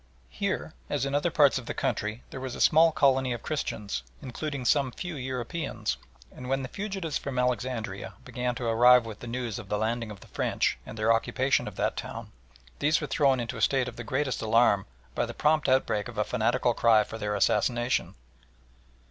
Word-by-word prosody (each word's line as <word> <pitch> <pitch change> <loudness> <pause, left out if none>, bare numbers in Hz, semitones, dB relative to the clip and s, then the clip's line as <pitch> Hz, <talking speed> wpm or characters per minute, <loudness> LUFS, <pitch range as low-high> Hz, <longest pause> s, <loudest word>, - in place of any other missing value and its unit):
Here 65 - -3 0.2
as - - 0
in 140 - -3
other 145 +4 +2
parts 145 -4 +4
of 120 - -12
the - - -4
country 105 +2 -2
there 135 - -6
was 130 -1 -5
a - - -8
small 160 +1 +6
colony 130 -4 +3
of 120 - -7
Christians, 105 -9 -3 0.2
including 140 0 -5
some 135 +1 +3
few 175 +7 -6
Europeans, 130 +4 -3 0.4
and 125 0 -8
when 135 0 0
the - - -4
fugitives 195 -5 -3
from 135 -2 -5
Alexandria 120 -6 -2
began 125 -1 -2
to 125 - -4
arrive 120 +1 +6
with 110 -2 -8
the 120 - -8
news 120 -2 -3
of - - -10
the 105 - 0
landing 115 +1 -1
of 105 -2 -10
the - - -13
French - - 0
and 115 - -8
their 110 +1 +3
occupation 130 +4 +1
of - - -7
that - - 0
town, - - -6 0.5
these 155 +2 +3
were 150 - -3
thrown 135 -1 +2
into 115 -1 -4
a - - -5
state 135 -2 +2
of 125 - -7
the 115 - -6
greatest 130 +2 -1
alarm 110 -3 +3 0.3
by - - -1
the - - -7
prompt 150 -1 +2
outbreak 125 -5 +2
of 120 -3 -10
a 105 - +2
fanatical 120 +2 +1
cry 110 -2 +4
for 110 - -8
their 105 -1 -1
assassination. 120 +4 +1
125 Hz, 200 wpm, -28 LUFS, 115-135 Hz, 0.5 s, small